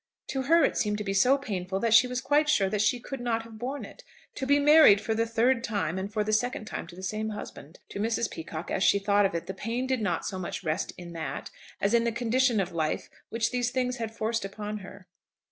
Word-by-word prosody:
To 265 - -1
her 330 +6 +4
it - - +1
seemed 210 -1 0
to 210 - -3
be 195 -1 -2
so 250 +8 +4
painful 190 -7 -3
that 230 -2 +2
she 240 +3 +7
was 250 0 -3
quite 295 +3 +2
sure 195 -9 +3
that 210 -1 0
she 220 +3 +2
could 270 +2 -7
not 230 -2 -1
have 225 -1 -12
borne 265 +4 -4
it. - - -14 0.3
To 265 - -4
be 285 +1 +5
married 295 -8 +7
for 220 - -2
the 225 +1 0
third 235 +2 +2
time, 195 -7 -2
and 195 +2 -5
for 215 -1 0
the 215 +1 -2
second 245 0 0
time - - -6
to 175 - -12
the 185 - -10
same 215 +3 -2
husband! 180 -7 -9
To - - -6
Mrs. 225 +2 0
Peacocke, 160 +1 -6
as 190 - 0
she - - +5
thought 200 0 +3
of 190 - -7
it, 170 - -3
the 190 - -5
pain 230 +6 -3
did 260 -2 -1
not 195 -5 -1
so 190 - -4
much 185 - -5
rest 155 -2 -1
in 175 -1 -9
that, 160 -2 -5 0.3
as 200 +3 +1
in 235 0 +4
the 235 - +1
condition 240 0 +1
of 190 -1 -1
life 160 -2 -2 0.2
which 230 0 -1
these 245 -1 0
things 250 0 -1
had 225 -2 -3
forced 225 0 -1
upon 210 +1 -5
her. 195 0 -12
220 Hz, 255 wpm, -28 LUFS, 195-245 Hz, 0.3 s, she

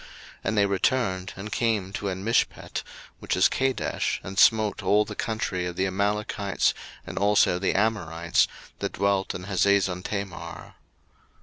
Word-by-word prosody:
01:014:007 - - -15 0.4
And 110 - 0
they 100 - +5
returned, 95 -2 0
and 105 +3 -7
came 105 -5 0
to 100 +1 -3
Enmishpat, 95 +5 -1 0.4
which - - -2
is 95 - +6
Kadesh, 135 -1 -1
and 95 +1 -4
smote 110 -3 +4
all 105 +1 +3
the - - -7
country 95 -5 -2
of 90 - -5
the 95 - +1
Amalekites, 100 +1 0 0.3
and - - -5
also 100 -3 +3
the 95 - 0
Amorites, 85 -6 +1 0.3
that - - -3
dwelt 100 0 0
in 90 - -6
Hazezontamar. 95 -1 -1
100 Hz, 140 wpm, -26 LUFS, 95-105 Hz, 0.4 s, is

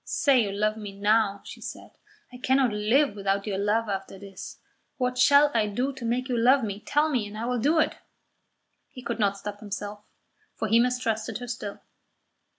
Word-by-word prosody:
"Say 275 -4 +3
you 205 -3 -1
love 215 +2 0
me 200 -2 -8
now," 205 -1 +2
she - - -10
said. - - -8 0.4
"I - - -8
cannot 260 -2 +2
live 215 +4 +2
without 195 0 -1
your 195 -3 -2
love 215 +3 +1
after 195 -1 -4
this. 195 -1 -10 0.4
What 250 -1 -1
shall 285 +3 +6
I 220 -2 +2
do 250 +7 -1
to 265 -2 -10
make 245 +2 -1
you 250 - -1
love 250 +3 +4
me? 205 -2 -3
Tell 295 +7 +1
me, 250 -9 -1
and 205 +1 -9
I 225 - -3
will 250 0 -1
do 295 +8 +2
it." 315 - +1 0.9
He 255 - -11
could 235 -1 -3
not 200 -2 +1
stop 205 +1 -7
himself, 205 0 -6 0.5
for 220 - -2
he 225 +2 +4
mistrusted 230 -3 0
her 245 +1 -8
still. 220 -4 -6
220 Hz, 195 wpm, -26 LUFS, 205-250 Hz, 0.9 s, shall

